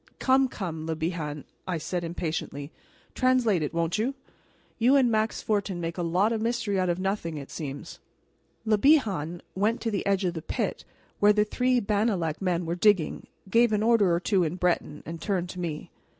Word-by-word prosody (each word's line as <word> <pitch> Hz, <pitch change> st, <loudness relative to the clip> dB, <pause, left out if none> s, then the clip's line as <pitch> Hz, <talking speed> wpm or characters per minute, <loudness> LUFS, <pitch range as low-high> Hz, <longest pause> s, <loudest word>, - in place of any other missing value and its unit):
"Come, 265 Hz, 0 st, +3 dB
come, 165 Hz, -9 st, -5 dB
Le 160 Hz, -, -1 dB
Bihan," 155 Hz, -3 st, -3 dB, 0.2 s
I 180 Hz, -2 st, -1 dB
said 175 Hz, +2 st, -3 dB
impatiently, 160 Hz, -3 st, -4 dB, 0.4 s
"translate 250 Hz, -8 st, +2 dB
it, 150 Hz, -, -2 dB
won't 170 Hz, +4 st, -1 dB
you? 255 Hz, +5 st, 0 dB, 0.6 s
You 250 Hz, +4 st, +5 dB
and 255 Hz, -4 st, +4 dB
Max 220 Hz, 0 st, 0 dB
Fortin 200 Hz, -4 st, -1 dB
make 165 Hz, -1 st, -3 dB
a 180 Hz, -, -3 dB
lot 180 Hz, +6 st, +2 dB
of 220 Hz, -, -2 dB
mystery 225 Hz, -4 st, 0 dB
out 185 Hz, -1 st, +1 dB
of 175 Hz, -, +1 dB
nothing, 185 Hz, -4 st, -2 dB
it 140 Hz, -2 st, -8 dB
seems." 145 Hz, -2 st, -6 dB, 0.7 s
Le 215 Hz, -1 st, +3 dB
Bihan 195 Hz, -, +2 dB
went 215 Hz, +5 st, +1 dB
to 225 Hz, -, -1 dB
the 200 Hz, -, -1 dB
edge 195 Hz, -1 st, +2 dB
of 175 Hz, -, 0 dB
the 160 Hz, -, -5 dB
pit -, -, -3 dB, 0.3 s
where 205 Hz, 0 st, +6 dB
the 210 Hz, 0 st, +3 dB
three 250 Hz, +3 st, +1 dB
Bannalec 200 Hz, -7 st, 0 dB
men 180 Hz, -2 st, 0 dB
were 165 Hz, -, -1 dB
digging, 180 Hz, -2 st, +2 dB, 0.2 s
gave 230 Hz, +3 st, +4 dB
an 210 Hz, 0 st, +1 dB
order 225 Hz, -5 st, +4 dB
or 170 Hz, -, +2 dB
two 190 Hz, 0 st, +2 dB
in 165 Hz, +1 st, -1 dB
Breton, 175 Hz, -4 st, -1 dB
and 165 Hz, 0 st, -7 dB
turned 180 Hz, -1 st, -1 dB
to 185 Hz, -, -7 dB
me. 160 Hz, -4 st, -4 dB
185 Hz, 195 wpm, -27 LUFS, 165-220 Hz, 0.7 s, where